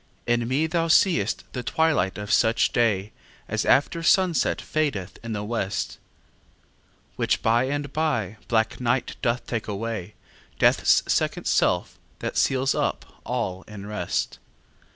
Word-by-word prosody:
In 120 -1 +1
me 135 +5 +1
thou 165 +1 0
see'st 160 - +3
the 125 - -3
twilight 145 - +1
of 105 0 -2
such 115 0 +3
day 110 -4 +1 0.4
As - - -1
after 160 +4 +3
sunset 175 0 +3
fadeth 130 -12 -2
in 115 -1 -4
the 105 -1 -3
west; 105 -2 -3 1.2
Which - - 0
by 115 +3 +3
and 145 +1 -3
by 120 - -1
black 110 -1 +1
night 125 +1 0
doth 120 +1 0
take 115 -3 -3
away, 105 -1 -4 0.4
Death's - - +4
second - - 0
self, - - +1 0.2
that - - -4
seals 135 0 +2
up - - -3
all 95 0 -2
in 100 -2 -9
rest. 105 +1 -3
115 Hz, 135 wpm, -25 LUFS, 105-145 Hz, 1.2 s, Death's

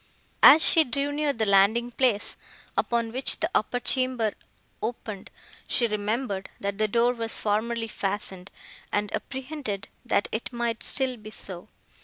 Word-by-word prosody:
As 315 +2 +9
she 325 - +5
drew 280 +1 -2
near 295 0 0
the 225 -5 -1
landing 210 +5 +3
place, 240 -5 0 0.4
upon 235 -1 0
which 260 +3 +2
the 320 +2 -1
upper 245 +4 0
chamber 255 -4 +2 0.5
opened, 215 -3 -5 0.4
she 240 - +2
remembered, 210 -1 -2
that 200 +1 -4
the 215 - +2
door 235 +3 +2
was 230 -2 -1
formerly 225 +2 -1
fastened, 195 -2 -4 0.4
and 205 0 -1
apprehended, 265 -7 -5
that - - +1
it 220 +4 -4
might 235 -1 -2
still 260 -2 +2
be 215 -1 -11
so. 185 -4 -8
230 Hz, 145 wpm, -26 LUFS, 205-255 Hz, 0.5 s, As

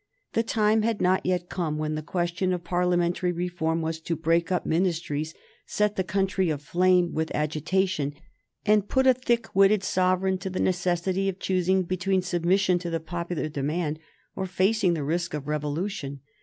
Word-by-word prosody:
The 225 - +3
time 220 -1 +2
had 225 -1 0
not 185 +1 +2
yet 180 -1 0
come 165 -5 -2
when 155 0 -2
the 155 - -2
question 175 +3 -1
of 175 -1 -3
parliamentary 175 0 +1
reform 170 -2 -1
was 160 0 -2
to 165 +1 -2
break 165 +2 +1
up 180 - 0
ministries, 160 -3 -1 0.3
set 210 0 0
the 190 - 0
country 190 0 0
aflame 175 +4 +2
with 160 0 -1
agitation, 155 0 0 0.5
and 210 -1 +3
put 265 0 +2
a 260 - +7
thick 240 -3 -1
witted 195 +1 +5
Sovereign 185 0 +1
to 190 - -4
the 185 - -4
necessity 185 +1 0
of 190 - -4
choosing 185 0 +1
between 185 +1 0
submission 180 +1 +2
to 175 -1 -4
the 165 0 -1
popular 170 -1 -3
demand 150 +2 -2 0.4
or 190 - -3
facing 190 0 +2
the 155 - -3
risk 165 +2 -1
of 145 -1 -6
revolution. 150 -1 -3
180 Hz, 170 wpm, -26 LUFS, 160-190 Hz, 0.5 s, a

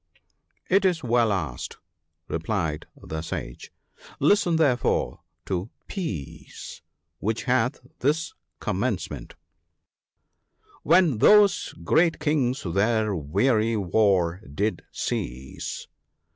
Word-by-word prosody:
"It 195 +2 +3
is 175 -4 +2
well 120 -2 +3
asked," 90 -11 -3 0.5
replied 80 -2 -2
the 80 0 -5
Sage; 80 -6 -6 0.3
" - - -20
listen 180 -5 +3
therefore 125 - +1 0.3
to 95 +3 -2
* - - -47
Peace/ 100 - -6 0.4
which 110 +3 -1
hath 125 0 +1 0.2
this 150 - 0 0.3
commence - - -1
ment - - -8 0.5
— - - -55
" 435 -1 -32
When 165 -12 +4
those 210 - +5
great 165 - +3
Kings 145 -4 0
their 105 +3 +1
weary 110 - +1
war 95 -2 +2
did 105 +9 -1
cease. 65 +2 -4
110 Hz, 105 wpm, -25 LUFS, -, 0.5 s, those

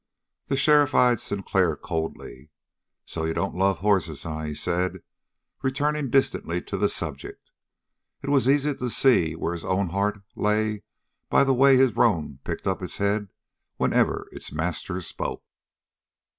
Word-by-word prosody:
The 135 - 0
sheriff 145 0 +4
eyed 125 -2 +4
Sinclair 95 -6 0
coldly. 80 -3 -5 0.6
"So 80 - -4
you 80 0 -1
don't 95 +4 -1
love 95 0 +1
hosses, 95 -7 +1
eh?" 80 -1 -4
he 75 - -4
said, 90 +3 -2 0.6
returning 140 +1 0
distantly 115 -9 +1
to - - -6
the - - +1
subject. - - -6 0.7
It 140 - -2
was 135 -2 +3
easy 145 +1 +3
to 125 -2 -4
see 100 - +3
where 85 +1 -2
his 85 - -6
own 95 -1 0
heart 100 +2 -1
lay 105 0 0 0.5
by - - +5
the 135 -1 +3
way 135 +1 +6
his 130 -3 +3
roan 80 - +1
picked - - -5
up 95 -1 -1
its 90 - -3
head 100 +1 0 0.5
whenever - - +1
its - - -6
master 85 +4 -3
spoke. - - -5
100 Hz, 150 wpm, -25 LUFS, 85-130 Hz, 0.7 s, way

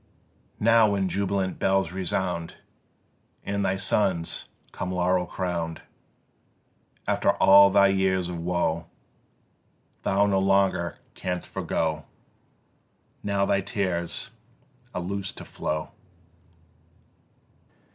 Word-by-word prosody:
Now 115 0 +5
when 100 -2 0
jubilant 100 -1 -1
bells 95 -3 +2
resound 90 -2 -2 0.9
And 100 0 -2
thy 95 - +1
sons 95 -3 0 0.3
come 90 - -4
laurel 90 0 +1
crown'd, 85 -3 -3 1.2
After - - +2
all 100 +1 +7
thy 100 0 +5
years 95 -2 +1
of 90 -1 -5
woe 85 -1 -1 1.1
Thou 100 +1 +2
no 100 -1 +2
longer 95 -3 +2 0.2
canst 90 -1 -4
forgo, 80 -3 -2 1.2
Now 100 -1 0
thy 100 0 +2
tears 95 -2 -2 0.6
are 90 - -1
loos'd 100 +2 -4
to - - -8
flow. 75 0 -4
95 Hz, 95 wpm, -26 LUFS, 85-100 Hz, 1.2 s, all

